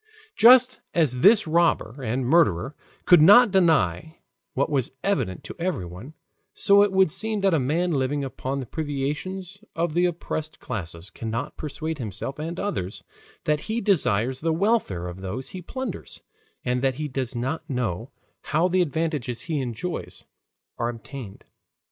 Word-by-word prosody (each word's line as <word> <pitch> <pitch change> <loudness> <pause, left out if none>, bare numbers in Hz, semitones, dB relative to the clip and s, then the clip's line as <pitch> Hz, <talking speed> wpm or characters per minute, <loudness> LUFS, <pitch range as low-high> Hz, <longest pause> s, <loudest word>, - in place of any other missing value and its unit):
Just 255 0 +6 0.2
as 140 -7 +2
this 210 - +6
robber 160 -6 +1
and 125 +2 -2
murderer 135 - +2 0.3
could 175 -3 +7
not 205 +7 +8
deny 160 - +2 0.4
what 140 +3 0
was 135 -3 -1
evident 190 - -1
to - - -8
everyone, 125 - -4 0.4
so 200 0 +5
it 205 -1 +3
would 190 -4 +3
seem 220 +2 -1
that 195 -2 +3
a 160 - +3
man 165 +7 0
living 140 0 0
upon 135 0 -4
the 130 - -5
privations 160 - -4
of 165 -1 -1
the 175 +2 +3
oppressed 155 -2 -5
classes 85 -2 -7
cannot 115 +6 -4
persuade 155 +1 -5
himself 110 +5 -5
and 165 +3 -4
others 105 - -4 0.4
that 150 -1 +1
he 225 +2 0
desires 130 - +1
the 165 +1 +1
welfare 165 - 0
of 90 +1 -8
those 100 +8 -5
he 185 - -7
plunders, 260 +9 -7 0.4
and 125 0 0
that 135 -1 +1
he 150 +2 -3
does 130 -3 -4
not 130 +7 -3
know 120 -3 -2 0.4
how 160 +4 +2
the 185 0 +2
advantages 150 -6 -2
he 155 -4 -2
enjoys 130 +8 -5 0.6
are 120 0 0
obtained. 120 -3 -9
150 Hz, 155 wpm, -24 LUFS, 125-175 Hz, 0.6 s, not